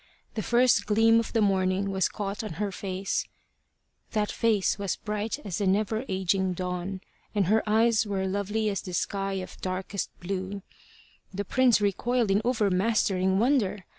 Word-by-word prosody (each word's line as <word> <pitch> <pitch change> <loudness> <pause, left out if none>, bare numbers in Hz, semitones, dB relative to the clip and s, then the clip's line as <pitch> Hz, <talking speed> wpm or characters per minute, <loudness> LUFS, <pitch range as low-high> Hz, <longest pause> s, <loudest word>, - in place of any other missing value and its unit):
The 220 - -2
first 240 +5 +3
gleam 225 +2 +5
of 230 - -3
the 225 -2 +2
morning 190 0 +1
was 190 -1 +1
caught 205 0 -4
on 215 - -5
her 200 +4 -2
face: 190 0 -3 0.9
that 210 -2 0
face 215 -4 +1
was 200 -2 -1
bright 210 +2 -3
as 185 -4 -3
the 200 - +1
never 215 +5 +1
aging 190 0 +1
Dawn, 180 +1 -4 0.3
and 200 -2 +3
her 215 +5 +3
eyes 220 0 +3
were 195 -2 -1
lovely 205 +3 -1
as 195 -3 -1
the 180 -2 -6
sky 195 +1 -1
of 185 -1 -6
darkest 185 +1 -3
blue. 190 +1 -4 0.7
The 200 +1 -4
prince 250 +2 +4
recoiled 225 +2 +1
in 200 +2 +3
overmastering 195 -4 +2
wonder. 210 -5 +1
200 Hz, 160 wpm, -27 LUFS, 190-220 Hz, 0.9 s, gleam